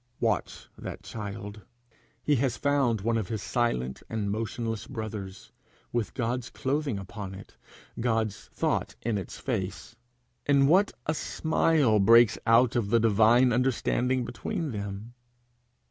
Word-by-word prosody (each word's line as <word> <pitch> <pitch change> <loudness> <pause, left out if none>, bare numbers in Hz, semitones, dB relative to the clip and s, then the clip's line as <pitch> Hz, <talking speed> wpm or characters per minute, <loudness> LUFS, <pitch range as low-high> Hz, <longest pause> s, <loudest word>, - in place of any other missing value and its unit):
Watch 110 -5 -1
that - - -7
child! 105 -1 -7 0.6
He 145 -2 +3
has 120 -2 0
found 135 -6 +1
one 115 +2 +1
of 105 - -3
his 110 -1 -4
silent 65 - -1
and 105 -3 -2
motionless 115 +1 -3
brothers, 105 -6 -6 0.4
with 120 -3 -1
God's 125 +1 -2
clothing 140 -3 -1
upon 95 0 -7
it, 95 - -12 0.4
God's 110 -3 -1
thought - - -2
in 110 -3 0
its 95 - -8
face. 100 -7 -4 0.5
In 140 -1 +5
what 185 +8 +4
a 155 - +1
smile 155 -7 +2
breaks 115 +2 +6
out 115 +1 +5
the 115 0 +2
divine 115 +3 +5
understanding 125 0 +1
between 140 +5 -4
them! 100 +2 -6
115 Hz, 130 wpm, -28 LUFS, 105-125 Hz, 0.6 s, breaks